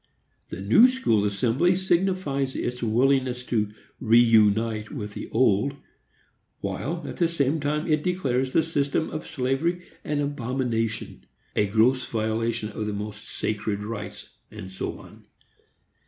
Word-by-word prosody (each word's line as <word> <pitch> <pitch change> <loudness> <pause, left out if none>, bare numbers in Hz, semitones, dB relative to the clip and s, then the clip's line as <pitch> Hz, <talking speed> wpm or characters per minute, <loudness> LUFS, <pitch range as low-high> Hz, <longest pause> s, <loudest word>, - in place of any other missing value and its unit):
The 95 - -6
New 110 - +7
School 250 - +1
Assembly 120 - +2
signifies 180 -7 0
its 125 0 -3
willingness 125 +2 +1
to 105 -4 0 0.3
reünite 110 -2 +4
with 105 0 -6
the - - -7
Old, 120 +3 +2 0.8
while, 170 +4 -3
at - - -7
the 170 - +3
same 155 -2 0
time, 150 +2 -1
it 155 -2 +2
declares 135 -8 0
the 160 - +3
system 145 -1 -1
of 155 - -5
slavery 150 +7 -1 0.2
an 150 -1 -1
abomination, 125 -5 -2 0.3
a 105 - +2
gross 115 +5 +3
violation 110 0 -1
of 105 0 -4
the 105 - -2
most 105 +1 -6
sacred 105 -1 -2
rights, 105 -1 -6 0.2
and 95 - -9
so 95 - -4
on. - - -15
125 Hz, 135 wpm, -25 LUFS, 110-145 Hz, 0.8 s, New